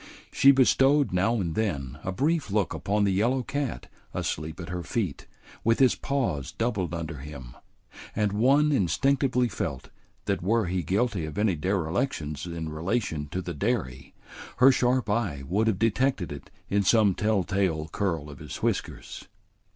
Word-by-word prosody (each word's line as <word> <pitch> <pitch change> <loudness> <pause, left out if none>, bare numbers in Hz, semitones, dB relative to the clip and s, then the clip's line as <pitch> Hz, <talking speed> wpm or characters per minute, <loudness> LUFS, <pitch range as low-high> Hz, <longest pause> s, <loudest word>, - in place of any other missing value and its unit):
She 135 - +5
bestowed 135 0 +4
now 100 +6 +2
and 90 -7 -1
then 70 -10 -2
a 95 - -2
brief 145 - 0
look 100 -1 0
upon 105 +1 0
the 100 - +2
yellow 120 +7 +1
cat 140 0 -3 0.3
asleep 80 +2 -3
at 85 -1 -7
her 90 0 -3
feet 90 - -3 0.4
with 115 +1 +3
his 130 -2 +5
paws 120 - -2
doubled 100 -8 -1
under 80 -2 -5
him, 65 -3 -9 0.6
and 105 -2 +1
one 135 +8 +3
instinctively 125 - +2
felt 70 - -5 0.3
that - - -1
were 110 +4 +2
he 90 +1 -1
guilty 100 +2 0
of 80 +4 -7
any 105 -3 +2
derelictions 80 - -2
in 85 -2 -5
relation 80 -1 -2
to 90 +5 -4
the 90 0 -4
dairy, 75 - -2 0.4
her 130 +2 +7
sharp 125 -2 +1
eye 100 -10 -1
would 105 +6 +1
have 110 -4 +2
detected 115 - +1
it 70 -1 -8 0.2
in 100 +1 +2
some 100 0 +4
tell 105 0 +1
tale 90 -5 0
curl 80 -4 -2
of 70 -2 -11
his - - -7
whiskers. - - -3
100 Hz, 160 wpm, -27 LUFS, 80-120 Hz, 0.6 s, her